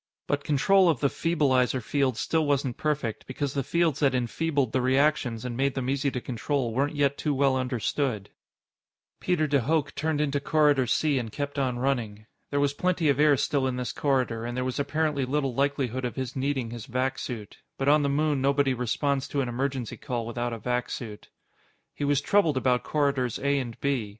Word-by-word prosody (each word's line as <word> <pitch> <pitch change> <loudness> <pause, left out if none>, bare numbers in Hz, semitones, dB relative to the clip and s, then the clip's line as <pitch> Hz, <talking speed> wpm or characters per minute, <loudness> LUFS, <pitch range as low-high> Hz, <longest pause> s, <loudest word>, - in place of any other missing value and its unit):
But 145 0 -1
control 180 +6 +4
of 155 -7 +1
the 140 - +2
feebleizer 135 -6 +1
fields 130 +1 0
still 160 -1 +1
wasn't 140 -4 0
perfect, 145 -7 -2
because 135 +1 -3
the 140 - 0
fields 165 +1 +1
that 140 -3 +2
enfeebled 135 +1 0
the 130 - +1
reactions 130 -3 +1
and 120 -1 -4
made 135 +2 0
them 130 -1 -1
easy 140 +1 0
to 130 - -3
control 125 0 -2
weren't 140 +5 0
yet 140 -1 +1
too 150 -2 0
well 135 -1 +3
understood. 125 -3 -2 0.9
Peter 175 -4 +1
de 145 -1 +2
Hooch 150 +3 0
turned 155 -1 -1
into 145 -1 0
Corridor 145 -3 +3
C 145 +3 +2
and 115 -3 -5
kept 145 +3 -4
on 130 -3 0
running. 120 -5 -2 0.2
There 140 - 0
was 140 0 +2
plenty 175 0 +1
of 140 0 +2
air 150 -2 +5
still 135 0 +1
in 130 - -2
this 125 -3 -3
corridor, 130 -5 0
and 120 +1 -4
there 125 - -1
was 130 0 -3
apparently 145 0 0
little 135 0 -1
likelihood 135 -2 -1
of 125 - -3
his 130 -3 -4
needing 135 -3 -1
his 120 +1 -7
vac 130 +1 -1
suit. 110 -5 -7 0.2
But 135 - -2
on 150 +1 +5
the 140 - +1
moon 145 -1 +1
nobody 140 0 +2
responds 130 +3 -1
to 140 - -1
an 125 - -2
emergency 130 -1 -3
call 120 -2 -3
without 120 +1 -3
a 115 - -4
vac 125 +3 -2
suit. 110 -4 -7 0.6
He 145 - -3
was 145 0 +2
troubled 165 -6 +2
about 125 -1 +2
Corridors 140 -5 0
A 140 0 +1
and 120 -4 -6
B. 135 -7 0
135 Hz, 200 wpm, -27 LUFS, 125-145 Hz, 0.9 s, air